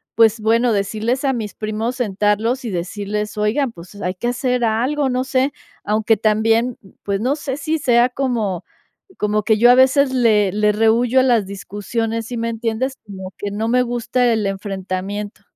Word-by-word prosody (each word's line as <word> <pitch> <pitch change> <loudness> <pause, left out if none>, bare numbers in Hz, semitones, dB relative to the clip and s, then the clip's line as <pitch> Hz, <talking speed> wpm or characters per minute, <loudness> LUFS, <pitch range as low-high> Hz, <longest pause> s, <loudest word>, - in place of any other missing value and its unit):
pues, 225 -1 +4
bueno, 230 +3 +3
decirles 220 +6 -1
a 270 - +2
mis 220 -4 -4
primos, 220 +3 -3
sentarlos 215 +3 0
y - - -2
decirles: 205 +4 -4
"Oigan, 230 +6 +1
pues, 175 +2 -13
hay 185 -1 -1
que 210 +6 -3
hacer 250 0 -1
algo, 260 +6 0
no 255 0 0
sé". 265 +1 +1 0.3
Aunque 215 +1 +2
también, 225 +3 +2 0.3
pues, 200 -1 -1
no 260 +5 +1
sé 280 -3 -4
si 310 +2 -1
sea, 245 -2 +3
como 235 -9 -2 0.5
como 210 0 0
que 220 0 +3
yo 240 +2 +6
a - - +6
veces 265 +1 +4
le 215 -6 +3
le 210 0 +2
rehúyo 230 +4 +3
a - - +4
las 240 -5 +3
discusiones, 210 +4 -4
¿sí 245 - -5
me 230 0 -1
entiendes?, 230 +3 -2
como 190 -2 -8
que 205 - -4
no 215 +2 -2
me 250 +2 +3
gusta 240 0 0
el 220 -2 0
enfrentamiento. 195 +1 -4
225 Hz, 175 wpm, -19 LUFS, 210-250 Hz, 0.5 s, yo